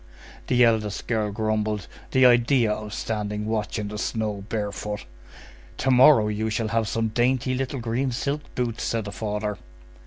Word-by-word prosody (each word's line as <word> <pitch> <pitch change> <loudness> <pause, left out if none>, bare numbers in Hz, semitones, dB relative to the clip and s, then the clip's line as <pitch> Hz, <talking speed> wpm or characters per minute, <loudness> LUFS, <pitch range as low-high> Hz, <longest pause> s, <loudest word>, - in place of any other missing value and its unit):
The 125 0 +4
eldest 110 -3 +1
girl 110 -3 0
grumbled:— 110 -1 -1 0.2
"The 130 0 +4
idea 120 -1 +4
of 105 0 -4
standing 105 -1 -3
watch 110 -1 -2
in 105 -1 -3
the 105 0 -5
snow 105 -3 -2
barefoot!" 105 -1 -3 0.7
"To 135 - +1
morrow 125 -3 +7
you 105 +1 -1
shall 110 0 -1
have 115 -1 0
some 115 +1 0
dainty 125 +3 +1
little 135 +1 -2
green 120 +3 -1
silk 140 +4 -2
boots!" 120 -2 -2
said 115 -2 -1
the 100 - -5
father. 105 0 -3
110 Hz, 160 wpm, -25 LUFS, 105-120 Hz, 0.7 s, morrow